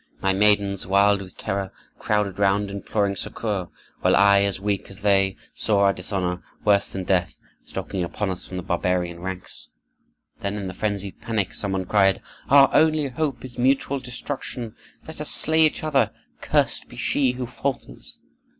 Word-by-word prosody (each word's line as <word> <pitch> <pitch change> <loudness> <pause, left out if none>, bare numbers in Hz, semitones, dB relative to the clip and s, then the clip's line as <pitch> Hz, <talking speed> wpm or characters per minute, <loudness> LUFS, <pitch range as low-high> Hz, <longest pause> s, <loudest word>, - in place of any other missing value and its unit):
My 95 0 +1
maidens, 100 -1 +3
wild 100 +1 +4
with 95 -1 -11
terror, 95 0 -3 0.3
crowded 105 -2 0
round, 100 0 +2
imploring 100 0 -1
succor; 100 -2 -3 0.3
while - - +3
I, 100 0 +6
as 100 -1 +1
weak 100 0 -2
as 95 -1 -11
they, 95 -1 +3 0.2
saw 105 -2 +1
our 100 0 +4
dishonor, 90 -1 -2 0.2
worse 100 -1 +3
than 95 - -5
death, 90 -2 0 0.3
stalking 95 -1 -4
upon 95 +3 -2
us 90 - -6
from 95 - -6
the 90 - -4
barbarian 90 0 -1
ranks. 95 0 -7 0.7
"Then, 100 +1 -3
in 100 -2 -4
the 95 - -5
frenzied 100 0 -3
panic, 110 -5 -1
some 100 -2 -2
one 95 -1 -1
cried, 95 0 +3 0.3
'Our 140 0 +7
only 155 -2 +3
hope 130 -2 -3
is 125 -1 -8
mutual 135 +2 +2
destruction! 125 -2 -5 0.3
Let 160 -1 -7
us 150 - -1
slay 160 +1 +3
each 155 - -5
other, 150 -3 +2 0.3
cursed - - +1
be - - -12
she 130 -3 +1
who 125 0 -4
falters! 135 +2 -3
100 Hz, 170 wpm, -24 LUFS, 95-120 Hz, 0.7 s, Our